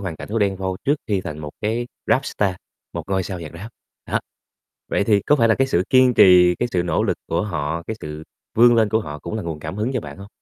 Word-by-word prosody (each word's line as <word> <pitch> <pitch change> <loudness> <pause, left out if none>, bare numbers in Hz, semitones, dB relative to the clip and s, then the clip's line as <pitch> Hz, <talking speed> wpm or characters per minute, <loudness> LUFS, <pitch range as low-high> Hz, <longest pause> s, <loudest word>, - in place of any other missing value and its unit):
hoàn 90 -5 -5
cảnh - - -9
của 115 - -1
Đen 100 -2 +1
Vâu 95 -1 -3
trước 145 - +3
khi 100 -3 0
thành 75 -4 -6
một 75 -1 -6
cái 115 +3 -1 0.2
Rap 135 - +2
star, 100 -3 0 0.4
một - - -4
ngôi 95 -1 0
sao 95 -1 -6
nhạc 80 -3 -7
Rap, 100 +7 -8 0.4
đó. - - 0 0.7
Vậy - - +1
thì 105 -1 +3
có 145 - +3
phải 115 -4 +3
là 110 - +5
cái 135 +3 +1
sự 90 -9 +1
kiên 130 -1 +5
trì, 90 -3 +7
cái 120 - 0
sự 90 - +1
nỗ 85 - 0
lực - - 0
của 85 - 0
họ, 85 -4 -3
cái 110 - -4
sự 75 0 -7 0.3
vươn 120 +1 +6
lên 110 -2 +3
của 110 +1 +1
họ 75 -7 -7
cũng 85 +6 -7
là 110 - -3
nguồn 80 -3 -5
cảm 80 +5 -6
hứng 110 +4 -1
cho - - 0
bạn - - -10
hông? 100 +1 -10
100 Hz, 270 wpm, -21 LUFS, 85-110 Hz, 0.7 s, trì